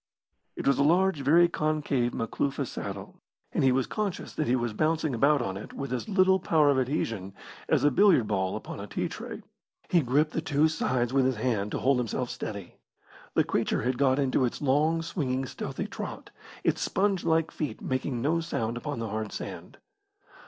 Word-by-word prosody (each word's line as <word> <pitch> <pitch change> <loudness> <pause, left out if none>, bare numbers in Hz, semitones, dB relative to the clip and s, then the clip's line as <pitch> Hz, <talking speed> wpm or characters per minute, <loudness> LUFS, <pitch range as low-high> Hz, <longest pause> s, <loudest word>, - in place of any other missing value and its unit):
It - - -5
was 140 -1 +3
a - - +5
large, 180 +2 +3
very 165 +6 +5
concave 150 -6 0
Makloofa 135 +5 -2
saddle, 100 -4 -7 0.3
and - - 0
he 130 - +5
was 130 0 +2
conscious 210 -4 -3
that 155 - -1
he 125 - +3
was 120 -3 -1
bouncing 155 +3 0
about 140 +3 +3
on 95 -3 -3
it 100 - -9
with 135 -2 -4
as 125 - -3
little 190 -1 +4
power 155 -4 +3
of 135 - +2
adhesion 115 -8 -2 0.3
as - - +3
a 145 - +5
billiard 185 - +5
ball 95 -2 0
upon - - -7
a - - -6
tea - - -2
tray. - - -7 0.5
He 175 - +5
gripped 145 +4 +2
the 160 - -1
two 150 0 +2
sides 125 -5 0
with 135 -1 +3
his 130 -1 +1
hands 110 -3 -1
to - - 0
hold 135 -1 +2
himself 125 +1 -2
steady. 100 -4 -6 0.6
The - - +5
creature - - 0
had 125 +1 -1
got 135 -2 +3
into 135 -2 +2
its 125 - -1
long, 155 +4 +2
swinging, 135 -6 -2
stealthy - - -5
trot, - - -7 0.3
its - - +1
sponge 195 -1 +1
like 160 -1 +2
feet 150 - -4
making 130 -2 -2
no 160 +4 +2
sound 120 -9 -2
upon 145 +2 -4
the 115 -1 -3
hard 110 0 -3
sand. - - -7
135 Hz, 195 wpm, -28 LUFS, 120-155 Hz, 0.6 s, a